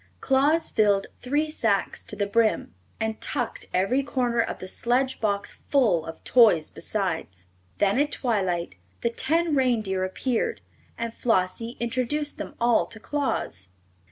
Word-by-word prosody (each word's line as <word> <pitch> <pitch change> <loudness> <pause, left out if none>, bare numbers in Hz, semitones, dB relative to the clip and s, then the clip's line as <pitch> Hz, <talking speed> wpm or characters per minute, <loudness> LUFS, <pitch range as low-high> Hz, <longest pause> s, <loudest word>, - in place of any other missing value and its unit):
Claus 285 +5 +2
filled 205 -2 +3 0.2
three 295 +5 0
sacks 215 -9 0
to - - -6
the 205 - 0
brim, 220 - +1 0.3
and 220 0 -2
tucked - - -2
every 195 +9 +2
corner 250 -3 -1
of 225 - -3
the 185 - -8
sledge 255 +6 0
box 200 -2 -1
full 215 - +3
of 160 - -8
toys 215 -11 +5
besides. 165 - -3 0.3
Then, 205 +5 +2
at 290 +1 +2
twilight, 190 -8 -1 0.3
the 235 - 0
ten 325 +6 +1
reindeer 220 -8 +1
appeared 245 - -1 0.4
and 230 -1 -3
Flossie 230 +1 0
introduced 255 +5 -1
them - - -6
all 235 -1 +3
to 220 - -7
Claus. 220 - -3
230 Hz, 140 wpm, -25 LUFS, 195-265 Hz, 0.4 s, toys